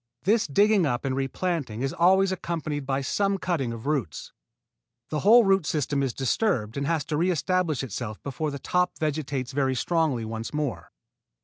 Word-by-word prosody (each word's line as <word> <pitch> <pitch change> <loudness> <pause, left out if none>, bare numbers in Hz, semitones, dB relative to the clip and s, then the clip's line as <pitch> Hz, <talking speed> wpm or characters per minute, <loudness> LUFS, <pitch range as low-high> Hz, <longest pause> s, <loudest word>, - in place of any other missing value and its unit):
This 210 +2 +2
digging 200 +3 +3
up 120 0 -2
and 130 -1 0
replanting 135 -3 -2
is 135 - -1
always 190 +2 +4
accompanied 155 -6 -3
by 135 0 0
some 195 +8 0
cutting 165 -10 -1
of 115 0 -7
roots. 140 - -2 0.8
The 155 - -1
whole 230 +7 +7
root 195 -2 +3
system 145 -2 0
is 135 -2 0
disturbed 130 - 0
and 140 0 -2
has 160 -4 0
to 150 - -2
re 175 +4 +2
establish 175 -4 0
itself 110 -3 -5
before 145 +3 -3
the 140 - -5
top 180 +6 0
vegetates 145 -5 -2
very 135 -1 0
strongly 150 -5 0
once 115 +4 -5
more. 150 -4 -3
150 Hz, 175 wpm, -26 LUFS, 130-180 Hz, 0.8 s, whole